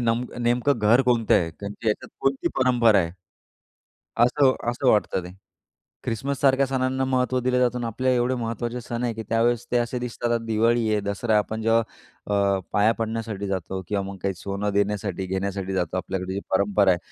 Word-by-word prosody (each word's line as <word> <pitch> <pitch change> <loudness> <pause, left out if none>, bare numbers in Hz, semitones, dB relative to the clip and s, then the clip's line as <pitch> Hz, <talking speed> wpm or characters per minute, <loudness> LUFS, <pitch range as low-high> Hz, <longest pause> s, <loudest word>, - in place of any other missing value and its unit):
नमक 120 +1 -1
नेमकं 120 +3 +1
घर 110 +4 +4
कोणतं 120 -3 +2
आहे? 85 -2 +2
कारण 100 +5 -7
की 110 +2 -10
त्याच्यात 105 - -1
कोणती 135 0 +1
परंपरा 120 -5 +4
आहे? 85 -2 0 1.2
असं 130 +1 +3 0.2
असं 125 +2 +1
वाटतं 105 -4 +2
ते. 90 - -9 0.7
ख्रिसमससारख्या 135 +3 +1
सणांना 130 0 0
महत्त्व 130 -1 +1
दिलं 125 0 +1
जातं 125 0 +2
आणि 120 - -3
आपल्या 130 +3 0
एवढे 125 +1 +1
महत्त्वाचे 120 +1 -3
सण 120 +1 -4
आहे, 120 -1 0
की 110 0 -6
त्यावेळेस 115 +1 +1
ते 125 - +3
असे 120 +1 -1
दिसतात. 120 -1 -1
दिवाळी 115 +1 +2
आहे, 105 - +2
दसरा 100 +3 -2
आहे, 105 - +6
आपण 110 +1 -3
जेव्हा 115 +1 +3 0.5
अ, 100 -1 +2
पाया 105 +2 +4
पडण्यासाठी 110 -3 -3
जातो 95 0 -3
किंवा 100 -1 -1
मग 100 0 -7
काही 100 -1 0
सोनं 100 +2 -3
देण्यासाठी, 100 -2 -1
घेण्यासाठी 95 0 -3
जातो 90 0 -1
आपल्याकडे 95 0 -3
जी 100 - -2
परंपरा 100 0 +3
आहे. 90 - +2
115 Hz, 180 wpm, -24 LUFS, 100-125 Hz, 1.2 s, आहे